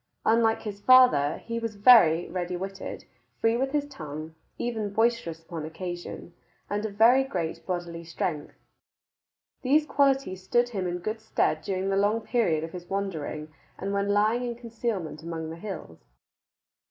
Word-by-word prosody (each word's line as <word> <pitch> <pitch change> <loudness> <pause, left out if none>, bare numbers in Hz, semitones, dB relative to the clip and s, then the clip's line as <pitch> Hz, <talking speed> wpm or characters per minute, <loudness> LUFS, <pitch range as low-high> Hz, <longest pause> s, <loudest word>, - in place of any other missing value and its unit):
Unlike 225 0 +3
his 205 -2 -6
father, 205 - +6
he 230 0 -3
was 230 -2 -4
very 200 -7 +6
ready 180 -1 -3
witted, 195 +1 -6 0.3
free 225 0 +3
with 265 +3 0
his 295 0 0
tongue, 155 - -8 0.2
even 220 -4 -2
boisterous 220 -7 +1
upon 165 -1 -6
occasion, 175 +2 -6 0.4
and 205 +1 -1
of 200 - -10
very 240 +5 +6
great 175 -11 -4
bodily 175 -2 -4
strength. 165 -2 -4 1.1
These 295 +4 +3
qualities 270 -11 +1
stood 240 +6 +2
him 195 -6 -2
in 175 0 -2
good 215 +5 -4
stead 155 -7 0
during 190 +2 -2
the 195 - +1
long 210 +3 +2
period 195 -10 +1
of 165 - -5
his 175 -1 -9
wandering 160 -6 -4 0.2
and 195 +1 -3
when 200 0 0
lying 215 +4 +3
in 240 -1 -3
concealment 230 -9 -4
among 160 -1 -5
the - - -6
hills. 175 - -7
200 Hz, 155 wpm, -27 LUFS, 170-230 Hz, 1.1 s, father